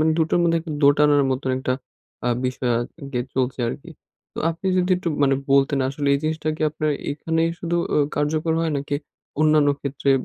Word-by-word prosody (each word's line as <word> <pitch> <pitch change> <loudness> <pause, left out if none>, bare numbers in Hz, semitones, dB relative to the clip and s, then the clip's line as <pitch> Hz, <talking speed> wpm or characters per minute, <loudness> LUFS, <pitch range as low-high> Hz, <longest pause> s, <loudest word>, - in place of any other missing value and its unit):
মানে 160 +1 +3
দুটোর 160 +1 +2
মধ্যে 165 -1 +3
একটু 160 -1 -6
দোটানার 145 0 +5
মতন 130 0 -1
একটা 130 -1 -1 0.5
আ - - +3 0.2
বিষয় 125 -1 -1
আরকি 135 0 -5
চলছে 130 0 -1
আরকি। 165 +7 -7 0.4
তো - - -10
আপনি 165 +3 -6
যদি 180 +1 +1
একটু 180 -2 -3
মানে 135 -1 +4 0.2
বলতেন 140 0 +3
আসলে 140 +1 -2
এই - - +1
জিনিসটা 155 0 -2
কি - - -4
আপনার 155 0 -1 0.2
এখানেই 165 +2 0
শুধু 170 0 -1 0.4
কার্যকর 155 +2 0
হয়? 165 -1 0
নাকি 140 +1 -2 0.4
অন্যান্য 155 -1 +4
ক্ষেত্রে 140 0 -1
150 Hz, 175 wpm, -22 LUFS, 140-160 Hz, 0.5 s, দোটানার